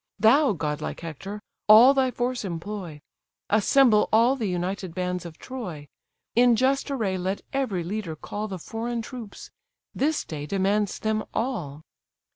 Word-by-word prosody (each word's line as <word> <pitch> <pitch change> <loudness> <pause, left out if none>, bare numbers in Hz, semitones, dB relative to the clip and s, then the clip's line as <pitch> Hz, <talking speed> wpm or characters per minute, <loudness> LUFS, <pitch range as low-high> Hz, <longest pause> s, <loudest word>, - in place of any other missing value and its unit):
Thou, 235 +5 +5
godlike 150 -3 -4
Hector! 170 +6 -7 0.3
all 225 +6 +9
thy 265 -2 +2
force 245 0 -2
employ, 175 -3 -6 0.5
Assemble 215 +1 +4
all 235 +4 +5
the 230 -6 -2
united 180 0 -3
bands 180 -1 -2
of 160 -1 -12
Troy; 180 - -7 0.5
In 240 0 +5
just 270 +4 +1
array 210 -9 -1
let 190 +2 -2
every 235 -10 -1
leader 185 -2 -4
call 210 +7 -5
The 190 -2 -5
foreign 230 +5 -4
troops: 235 -4 -9 0.4
this 305 +3 0
day 150 -2 -6
demands 200 +2 0
them 215 0 -1
all!" 170 - -3
210 Hz, 140 wpm, -25 LUFS, 180-240 Hz, 0.5 s, all